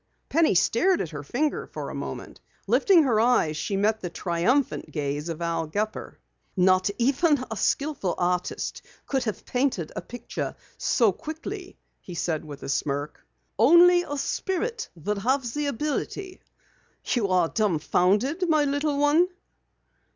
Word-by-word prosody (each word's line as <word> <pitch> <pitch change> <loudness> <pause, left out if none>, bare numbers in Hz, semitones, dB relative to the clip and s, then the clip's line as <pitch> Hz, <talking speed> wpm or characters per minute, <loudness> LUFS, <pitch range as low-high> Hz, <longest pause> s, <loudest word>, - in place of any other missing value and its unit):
Penny 320 - +3
stared 345 - +3
at 165 - -3
her 150 -2 -6
finger 275 - -2
a - - -5
moment. - - -7 0.2
Lifting 365 -5 +5
her 235 -6 +2
eyes 225 -10 +3
she 195 +6 -2
met 215 +2 +1
the 180 - -4
triumphant 175 - 0
gaze 145 +1 -3
of 165 +1 -4
Al 165 -1 -1
Gepper. 210 +6 -3 0.4
"Not 185 +1 +4
even 275 +2 +2
a - - -2
skillful 275 -2 0
artist 180 0 -2 0.2
could 265 -2 -1
have 215 - -4
painted 245 - -1
a - - -3
picture 245 -1 -6 0.2
so 230 -5 +2
quickly," 330 - -7 0.2
he 180 - -10
said 165 -2 -1
with 145 -2 -10
a - - -5
smirk. 145 +1 -2 0.4
"Only 345 +8 +7
a 290 -4 -5
spirit 430 - -2
would 200 +5 -3
have 260 +6 +1
the 295 0 -1
ability. 305 - -3 0.6
You 230 -5 +1
are 180 -3 +2
dumbfounded, 210 - +1
my 310 -2 +4
little 285 +1 0
one?" 295 +5 +4
235 Hz, 145 wpm, -26 LUFS, 180-295 Hz, 0.6 s, Only